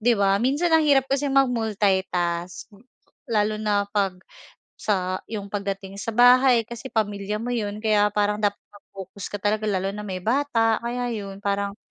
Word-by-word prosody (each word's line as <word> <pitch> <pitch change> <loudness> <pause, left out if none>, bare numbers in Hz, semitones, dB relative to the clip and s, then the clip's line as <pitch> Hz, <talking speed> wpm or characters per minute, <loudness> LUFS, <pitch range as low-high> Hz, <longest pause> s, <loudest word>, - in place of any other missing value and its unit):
'di 235 +1 +3
ba? 200 0 +2
Minsan 290 +8 +1
ang 320 - +6
hirap 270 -2 +5
kasi 275 +1 -1
mag-multitask, 195 -9 0 0.6
lalo 215 -1 0
na 205 -1 +1
'pag 195 -3 0 0.6
sa 185 -3 -1
yung 205 -3 -6
pag 205 - -1
dating 195 0 -5
sa - - -8
bahay 245 0 +6
kasi 235 +2 -9
pamilya 210 -1 -2
mo 245 - -3
'yun, 210 -3 -3
kaya 210 -1 +4
parang 210 0 +1
dapat 205 -1 +1 0.2
naka-focus 195 -1 -10
ka - - -5
talaga, 210 +2 -1
lalo 195 0 -1
na 210 - -7
may 185 -3 -6
bata, 230 -3 +1
kaya 240 +1 -3
yun 200 -3 -6
parang 200 0 -1
210 Hz, 165 wpm, -24 LUFS, 200-235 Hz, 0.6 s, ang